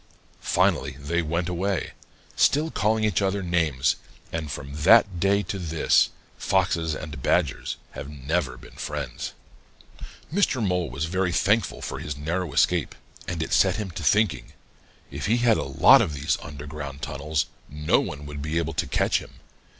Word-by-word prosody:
Finally 70 Hz, -1 st, +1 dB
they 85 Hz, +4 st, -1 dB
went 85 Hz, +2 st, -1 dB
away, 90 Hz, +1 st, -1 dB, 0.4 s
still 155 Hz, +3 st, +3 dB
calling 110 Hz, +1 st, +1 dB
each 105 Hz, -5 st, +2 dB
other 100 Hz, 0 st, 0 dB
names, 80 Hz, -7 st, +1 dB, 0.4 s
and 80 Hz, -2 st, -3 dB
from 70 Hz, +1 st, -6 dB
that 90 Hz, +4 st, +6 dB
day 100 Hz, +2 st, +2 dB
to 100 Hz, -, -4 dB
this, 80 Hz, -3 st, +3 dB, 0.3 s
Foxes 85 Hz, -4 st, +1 dB
and 75 Hz, -4 st, -7 dB
Badgers 75 Hz, -1 st, 0 dB
have 70 Hz, -, -7 dB
never 75 Hz, +5 st, -2 dB
been -, -, -14 dB
friends. 70 Hz, -5 st, -5 dB, 1.0 s
"Mr. 185 Hz, -9 st, +2 dB
Mole 90 Hz, -3 st, 0 dB
was 70 Hz, +5 st, -3 dB
very 95 Hz, +2 st, 0 dB
thankful 105 Hz, +3 st, +1 dB
for -, -, -4 dB
his 70 Hz, -1 st, -5 dB
narrow 85 Hz, +3 st, -2 dB
escape, -, -, +2 dB, 0.3 s
and 85 Hz, -3 st, -2 dB
it -, -, -4 dB
set -, -, +4 dB
him 105 Hz, -4 st, -4 dB
to 85 Hz, -, -6 dB
thinking. 105 Hz, +5 st, +2 dB, 0.6 s
If -, -, -4 dB
he 115 Hz, +3 st, +3 dB
had 120 Hz, -2 st, +4 dB
a -, -, -1 dB
lot 70 Hz, 0 st, +6 dB
of 75 Hz, -, -1 dB
these 70 Hz, +2 st, 0 dB
underground 75 Hz, -1 st, -7 dB
tunnels, 75 Hz, +1 st, -1 dB, 0.2 s
no 75 Hz, +1 st, +2 dB
one 75 Hz, 0 st, -5 dB
would 75 Hz, 0 st, -7 dB
be 75 Hz, +3 st, -2 dB
able 80 Hz, -1 st, -1 dB
to -, -, -1 dB
catch -, -, +2 dB
him. -, -, -13 dB
80 Hz, 165 wpm, -25 LUFS, 75-95 Hz, 1.0 s, that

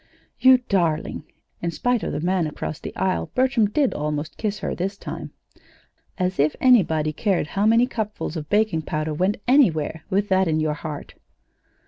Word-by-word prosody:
"You 260 Hz, 0 st, +7 dB
darling!" 165 Hz, -5 st, 0 dB, 0.4 s
(In 170 Hz, -, -1 dB
spite 245 Hz, +7 st, 0 dB
of -, -, -3 dB
the -, -, -3 dB
man 180 Hz, -1 st, +1 dB
across 150 Hz, 0 st, -5 dB
the -, -, -8 dB
aisle 190 Hz, -1 st, -1 dB
Bertram 255 Hz, -5 st, +2 dB
did 275 Hz, +4 st, +1 dB
almost 150 Hz, +1 st, -3 dB
kiss 210 Hz, -2 st, -2 dB
her -, -, -3 dB
this 195 Hz, +3 st, -3 dB
time.) -, -, -7 dB, 0.9 s
"As 185 Hz, -2 st, -1 dB
if 150 Hz, +1 st, +2 dB
anybody 160 Hz, -12 st, +3 dB
cared 185 Hz, -5 st, 0 dB
how 205 Hz, +2 st, +1 dB
many 230 Hz, +2 st, +5 dB
cupfuls 215 Hz, -, -4 dB
of 155 Hz, -2 st, -6 dB
baking 210 Hz, -6 st, +2 dB
powder 155 Hz, -1 st, -3 dB
went 185 Hz, +6 st, 0 dB
anywhere 160 Hz, -, +3 dB
with 200 Hz, +1 st, +1 dB
that 190 Hz, -1 st, +3 dB
in 155 Hz, -1 st, +1 dB
your 155 Hz, -1 st, 0 dB
heart!" 150 Hz, -1 st, -7 dB
185 Hz, 170 wpm, -23 LUFS, 155-215 Hz, 0.9 s, You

